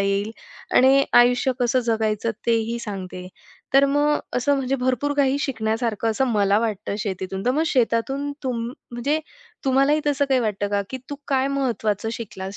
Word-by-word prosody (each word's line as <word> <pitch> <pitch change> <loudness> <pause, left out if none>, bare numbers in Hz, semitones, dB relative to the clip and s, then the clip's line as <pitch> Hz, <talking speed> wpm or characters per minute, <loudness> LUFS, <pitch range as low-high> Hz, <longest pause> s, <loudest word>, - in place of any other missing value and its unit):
येईल. 200 +2 0 0.5
आणि 270 +2 +6 0.2
आयुष्य 245 +2 +3
कसं 245 +1 +2
जगायचं 220 0 0 0.2
ते 230 -1 +4
ही 235 - -2
सांगते, 190 -5 -6 0.5
तर 275 +1 +7
मग 290 +1 +2 0.2
असं 280 +3 +2
म्हणजे 270 0 -1
भरपूर 260 +3 0
काही 280 -1 +2
शिकण्यासारखं 225 -3 -1
असं 265 +5 +1
मला 200 -1 +3
वाटतं 215 -3 -2
शेतीतून. 190 -1 -4
तर - - +4
मग 295 +5 +1
शेतातून 270 +2 0
तुम 245 -4 -2 0.3
म्हणजे 275 +6 0 0.5
तुम्हालाही 275 +3 +3
तसं 285 -1 +2
काही 265 -2 +3
वाटतं 205 -3 -1
का 200 0 0
की 260 - -4
तू 285 - -4
काय 270 -1 +2
महत्त्वाचं 225 -5 -1
शिकलास 200 -4 -6
240 Hz, 160 wpm, -23 LUFS, 215-270 Hz, 0.5 s, तर